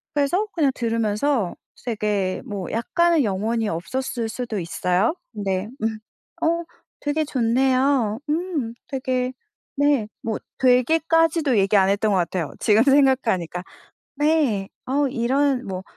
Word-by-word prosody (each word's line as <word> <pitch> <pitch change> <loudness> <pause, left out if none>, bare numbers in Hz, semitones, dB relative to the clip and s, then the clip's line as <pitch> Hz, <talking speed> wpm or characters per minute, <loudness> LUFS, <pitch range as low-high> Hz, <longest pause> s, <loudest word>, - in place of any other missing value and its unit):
그래서 295 +8 +2
그냥 295 -5 +2
들으면서 230 -1 0 0.3
되게 210 -5 -1
뭐 200 -7 -5
약간은 335 +7 +2
영혼이 220 +2 -1
없었을 230 +8 -3
수도 230 -2 -4
있어요. 180 - 0 0.2
근데 195 -2 -2
"음 220 0 -1 0.4
어 335 +1 +2 0.4
되게 295 +2 0
좋네요. 255 -3 +2
음 310 -7 -1
되게" 255 -2 -1 0.5
네 285 -6 +2
뭐 225 -1 -2 0.2
되게 255 +5 +4
까지도 325 -5 +3
얘기 195 +1 +3
안 190 -1 +4
했던 210 +2 +1
것 195 - +3
같아요, 175 -1 -2
지금 215 +1 +4
생각하니까. 255 - +2 0.5
네. 290 -10 +1 0.2
"어 280 +2 +1
이런" 265 +2 +1
뭐 185 -1 -4
240 Hz, 250 characters per minute, -23 LUFS, 205-285 Hz, 0.5 s, 되게